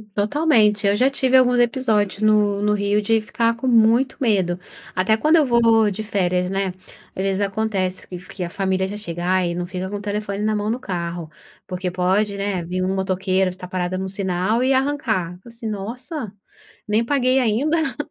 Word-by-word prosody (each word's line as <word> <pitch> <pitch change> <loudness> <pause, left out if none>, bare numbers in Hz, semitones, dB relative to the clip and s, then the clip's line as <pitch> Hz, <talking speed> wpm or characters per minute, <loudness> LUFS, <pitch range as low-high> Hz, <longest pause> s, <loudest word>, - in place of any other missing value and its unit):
Totalmente, 210 -3 +2
eu 200 - +3
já 255 +5 +3
tive 265 -1 +1
alguns 250 -1 +5
episódios 225 -5 +1
no 210 -2 +3
no 210 0 +2
Rio 205 0 +1
de 225 +2 +2
ficar 220 +2 0
com 260 - -3
muito 235 +2 +4
medo, 190 -8 +1 0.4
até 190 +4 +2
quando 310 +7 +3
eu 315 -3 +5
vou 230 -3 +4
de 205 +3 -5
férias, 180 -4 0
né. 195 0 -1 0.5
Às - - -4
vezes 195 0 0
acontece 195 -2 -2
que 180 - -7
que 180 +1 -8
a - - -6
família 190 0 -1
já 200 - -6
chegar 180 -2 -1
e 170 - -1
não 175 0 -3
fica 185 +1 -5
com 205 - -4
o - - -8
telefone 205 -1 -3
na 215 0 +1
mão 210 0 -1
no 235 +3 -1
carro, 170 -6 -4 0.4
porque 180 0 -3
pode, 190 +3 +1
né, 195 -3 -2
vir 180 +2 -3
um 190 +1 0
motoqueiro, 190 0 0
estar 180 0 -9
parada 185 0 -2
no 190 0 -3
sinal 190 +4 -1
e 260 - +2
arrancar, 260 - -1
assim, 230 -1 -8
“Nossa, 230 - -5 0.6
nem 215 +2 +2
paguei 255 0 +2
ainda", 270 +6 +1
205 Hz, 190 wpm, -21 LUFS, 185-230 Hz, 0.6 s, alguns